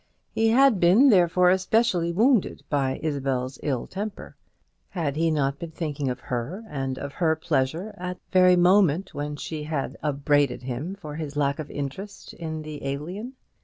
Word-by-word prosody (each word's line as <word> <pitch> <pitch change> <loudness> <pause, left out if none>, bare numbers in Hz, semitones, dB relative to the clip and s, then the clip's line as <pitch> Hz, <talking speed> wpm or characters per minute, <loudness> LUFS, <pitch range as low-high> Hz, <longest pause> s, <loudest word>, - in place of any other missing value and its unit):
He 225 - +1
had 255 -2 +5
been, 195 +12 +6
therefore, 180 -3 +5
especially 190 -2 +2
wounded 225 +4 +2
by 135 -3 0
Isabel's 135 -4 -2
ill 135 -5 -1
temper. 205 +2 -6 0.5
Had 155 -6 -2
he 165 +1 +2
not 140 -3 0
been 170 - -6
thinking 150 -4 -3
of 125 0 -4
her 130 - -4
and 135 -6 -3
of 140 0 -6
her 160 -1 +1
pleasure 160 +7 -1
at 180 0 -4
the - - -42
very 180 0 +6
moment 180 0 +3
when 145 +1 -4
she 150 +1 -5
had 140 -3 -3
upbraided 145 -2 +1
him 135 +9 -4
for 155 -7 -8
his 150 -2 -5
lack 140 0 +1
of 150 - -5
interest 185 +9 -6
in 160 -2 -5
the 155 -1 -8
Alien? 175 - -5
155 Hz, 165 wpm, -25 LUFS, 140-185 Hz, 0.5 s, been